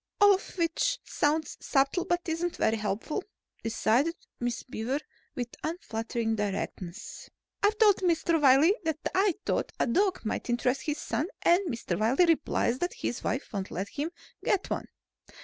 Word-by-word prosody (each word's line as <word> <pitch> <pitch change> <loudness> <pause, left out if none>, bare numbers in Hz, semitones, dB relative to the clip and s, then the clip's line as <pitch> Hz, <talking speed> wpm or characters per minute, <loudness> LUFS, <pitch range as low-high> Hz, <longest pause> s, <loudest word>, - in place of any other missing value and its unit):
"All 410 0 +8
of 385 0 -4
which 340 +9 +1
sounds 300 +1 0
subtle 275 +6 +1
but 350 0 +1
isn't 330 +2 -1
very 220 - +2
helpful," 215 - -2 0.4
decided 230 +8 +2 0.2
Miss 240 -1 -2
Beaver 250 +3 -2 0.4
with 245 -4 -3
unflattering 225 -8 -2
directness. 195 -3 -4 0.3
"I've 415 +1 +3
told 420 -3 +6
Mr. 335 -2 +2
Wiley 280 +6 +6
that 320 -2 0 0.2
I 385 -1 +3
thought - - 0
a - - +3
dog 370 - +1
might 220 - -2
interest 250 +2 +1
his 300 -1 -2
son 300 - -2 0.2
and 355 +2 +4
Mr. 225 - -2
Wiley 245 +11 +4
replies 305 -6 +1
that 355 - -1
his 240 - -3
wife 250 +2 -2
won't 195 -2 -3
let 190 +3 -4
him 295 +3 -3 0.3
get 385 - 0
one. - - -2
290 Hz, 155 wpm, -29 LUFS, 230-350 Hz, 0.4 s, All